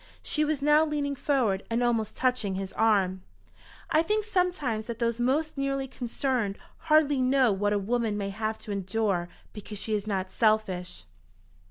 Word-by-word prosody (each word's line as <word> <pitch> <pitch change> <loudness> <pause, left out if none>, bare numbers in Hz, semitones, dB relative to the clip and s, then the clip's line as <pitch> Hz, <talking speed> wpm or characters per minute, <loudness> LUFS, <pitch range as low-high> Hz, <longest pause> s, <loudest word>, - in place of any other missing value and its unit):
She 305 - 0
was 300 -2 -1
now 300 +1 +5
leaning 295 -2 -1
forward 255 -8 +1
and 230 +1 0
almost 230 -3 0
touching 250 -7 0
his 190 0 -5
arm. 195 -4 +2 0.7
"I 310 - +5
think 425 +5 0
sometimes 355 - 0
that 235 -2 -4
those 235 0 -1
most 280 +5 0
nearly 275 0 -1
concerned 245 -4 -2 0.3
hardly 295 -3 +4
know 255 -2 +4
what 205 +1 0
a 205 - +2
woman 220 +1 -1
may 200 -1 -3
have 215 +2 -3
to 210 - -5
endure 195 -2 -1 0.2
because 210 0 -7
she 215 +2 -3
is 210 0 -1
not 190 -2 -2
selfish." 215 - 0
230 Hz, 165 wpm, -28 LUFS, 205-275 Hz, 0.7 s, now